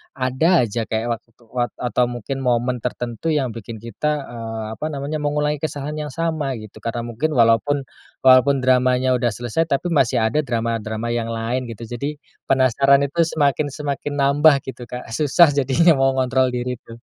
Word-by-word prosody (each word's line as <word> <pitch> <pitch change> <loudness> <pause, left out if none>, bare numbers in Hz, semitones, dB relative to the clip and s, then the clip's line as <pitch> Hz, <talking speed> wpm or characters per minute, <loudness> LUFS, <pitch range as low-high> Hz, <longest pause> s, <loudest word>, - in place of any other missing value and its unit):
ada 130 +6 +2
aja 115 0 -3
kayak 115 +2 -1
waktu - - -39 0.2
wat 120 -1 -2
atau 125 0 0
mungkin 120 +2 -5
momen 125 0 0
tertentu 120 +6 -3
yang 135 -5 0
bikin 115 0 -9
kita, 115 +7 -2 0.2
eee, 115 -1 -5 0.2
apa - - -3
namanya, 145 +1 -4
mengulangi 150 0 0
kesalahan 150 0 -4
yang 145 - -8
sama 155 -5 -1
gitu, 110 -1 -11
karena 115 +2 -4
mungkin 120 +7 -2
walaupun 120 +4 +3 0.4
walaupun 130 +1 +5
dramanya 130 0 +3
udah 125 -1 +1
selesai, 120 +9 -1
tapi 165 +4 -1
masih 130 -6 +2
ada 110 +7 +1
drama-drama 115 -3 -2
yang 115 -1 -1
lain 115 +2 -2
gitu. 115 0 -8
Jadi, 130 +6 -4 0.3
penasaran 135 +1 +4
itu 140 +4 -4 0.2
semakin-semakin 145 -1 -1
nambah 140 +1 +4
gitu 125 -3 -8
Kak, 125 -1 -8
susah 150 +5 +4
jadinya 140 +5 +3
mengontrol 130 -1 +2
diri 125 0 -3
tuh. 115 -2 -13
130 Hz, 160 wpm, -21 LUFS, 120-145 Hz, 0.4 s, walaupun